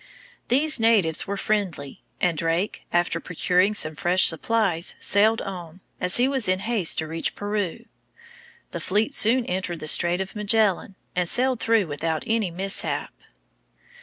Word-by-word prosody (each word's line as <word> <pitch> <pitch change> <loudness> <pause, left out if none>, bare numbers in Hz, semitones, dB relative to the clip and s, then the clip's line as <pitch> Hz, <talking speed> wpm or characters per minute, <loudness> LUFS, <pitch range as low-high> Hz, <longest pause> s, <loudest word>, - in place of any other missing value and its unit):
These 280 +3 +2
natives 210 -8 +2
were 200 0 -3
friendly, 190 -10 -3 0.2
and 180 -2 +1
Drake, 165 +5 -2
after 175 0 0
procuring 180 +3 +1
some 155 -6 +1
fresh 175 +4 +2
supplies, 180 -1 +1
sailed 215 +3 +2
on, 180 -2 -8 0.2
as 180 +1 +2
he 245 +2 +3
was 265 -6 +1
in 185 - +2
haste 200 -3 0
to 160 - -2
reach 165 +1 -2
Peru. 205 -3 -3 0.9
The - - -5
fleet 210 +3 0
soon 235 +3 +3
entered 180 -3 -3
the 155 - -7
Strait 175 +3 +2
of 190 +2 -5
Magellan, 210 -2 +1 0.2
and 180 -1 0
sailed 255 -1 +1
through 225 -3 +2
without 160 +1 -3
any 220 -4 0
mishap. 190 +3 -2
190 Hz, 150 wpm, -24 LUFS, 170-220 Hz, 0.9 s, he